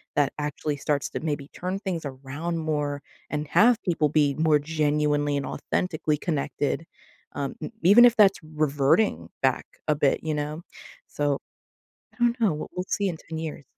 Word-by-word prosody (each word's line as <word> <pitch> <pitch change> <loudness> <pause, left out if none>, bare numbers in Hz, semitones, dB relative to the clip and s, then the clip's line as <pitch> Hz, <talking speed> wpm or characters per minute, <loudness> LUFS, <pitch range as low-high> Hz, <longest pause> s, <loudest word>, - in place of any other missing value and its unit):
that 145 -2 +3
actually 150 0 -2
starts 140 0 -1
to - - -4
maybe 145 -2 -3
turn 185 +2 -4
things 185 -5 -3
around 140 +5 -5
more 150 -2 -2 0.3
and 150 - -1
have 235 +1 +5
people 160 -3 +2
be 145 -1 +2
more 150 - +6
genuinely 150 -1 +1
and 140 - -1
authentically 155 -1 -1
connected, 150 0 -2 0.5
um, 140 -1 -2
n - - -5
even 205 +8 +8
if 240 -1 +5
that's 200 -3 +5 0.2
reverting 140 - +2
back - - +1 0.3
a - - -5
bit, 135 - +3
you 155 - -1
know? 150 +2 -3 0.5
So, 145 -1 -1 0.8
I - - -26
don't 240 +1 +3
know. 220 -4 +4
W - - -5
we'll 180 +1 -4
see 200 - +1
in 175 - -3
10 160 0 -8
years. 155 -3 -5
150 Hz, 170 wpm, -26 LUFS, 145-175 Hz, 0.8 s, even